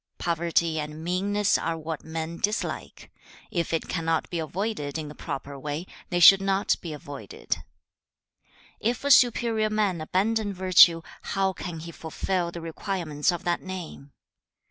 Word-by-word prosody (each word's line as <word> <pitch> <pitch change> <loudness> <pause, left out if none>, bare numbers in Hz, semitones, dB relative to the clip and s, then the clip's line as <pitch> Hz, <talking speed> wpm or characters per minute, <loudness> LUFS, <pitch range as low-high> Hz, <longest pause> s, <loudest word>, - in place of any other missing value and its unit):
Poverty 170 -1 0
and 150 +1 -6
meanness 200 +4 +1
are 165 0 -2
what 160 -1 -5
men 160 +1 -5
dislike. 210 +2 -3 0.4
If 170 -2 -1
it 165 - -1
cannot 165 -2 0
be 170 - -1
avoided 160 -3 -3
in 155 -2 -5
the - - -8
proper 140 -1 -6
way, 150 +4 -4 0.2
they 175 - 0
should 190 +3 +9
not 195 0 +2
be 170 - -6
avoided. 145 - -10
2. - - +2 1.2
'If 240 +4 -1
a 285 - +2
superior 230 -4 +4
man 205 -6 0
abandon 205 +5 0
virtue, 180 -2 +6 0.2
how 195 -1 0
can 170 -3 -6
he 170 +1 -7
fulfil 170 +2 -2
the 170 - -7
requirements 165 -2 -1
of 175 - -5
that 175 -1 0
name? 175 -7 -8
170 Hz, 150 wpm, -26 LUFS, 160-195 Hz, 1.2 s, should